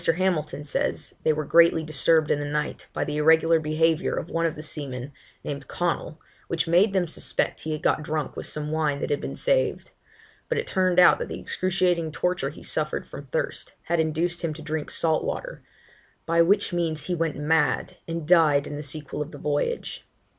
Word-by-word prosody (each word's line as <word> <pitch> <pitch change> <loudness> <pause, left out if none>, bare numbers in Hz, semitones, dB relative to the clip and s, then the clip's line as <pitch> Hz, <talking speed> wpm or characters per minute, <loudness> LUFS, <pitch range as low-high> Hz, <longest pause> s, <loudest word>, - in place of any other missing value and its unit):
Hamilton 160 -5 -1
says 145 - -2
they 155 - +3
were 155 0 -2
greatly 165 +1 +5
disturbed 155 +1 +3
in 145 - +2
the 145 - -3
night, 150 +1 -3
by - - -2
the 150 0 -3
irregular 160 +2 +5
behaviour 160 +2 +1
of 170 - -5
one 165 0 +1
of 160 - -4
the 155 - -8
seamen, 140 -3 -5 0.3
named 140 -2 -5
Connell, 170 -2 -2 0.3
which 170 -1 0
made 180 +5 +4
them 185 -2 +2
suspect 165 - -2
he 160 - -5
had 155 - -5
got - - +2
drunk 155 -1 -3
with - - -5
some 150 0 -4
wine 150 -3 0
that - - -3
had 145 - 0
been - - -5
saved; - - 0 0.6
but 485 - 0
it 455 - -1
turned 185 -1 +2
out 180 - +7
that - - -3
the - - -6
excruciating 180 -3 0
torture 175 -3 -1
he 150 - -12
suffered - - -1
from - - -10
thirst - - -3
had 170 -1 0
induced 165 +2 0
him 160 -3 -2
to 155 - -9
drink 155 0 -3
salt 160 -1 +1
water; - - -4 0.6
'by 170 0 +3
which 200 +3 +3
means 165 -3 -1
he 180 - -2
went 165 -3 -1
mad, 150 +1 +1
and 165 -2 -4
died 155 -5 +5
in 145 - -6
the - - -4
sequel 150 0 -5
of 150 - -4
the 150 - -10
voyage.' 145 0 -2
160 Hz, 200 wpm, -25 LUFS, 150-170 Hz, 0.6 s, out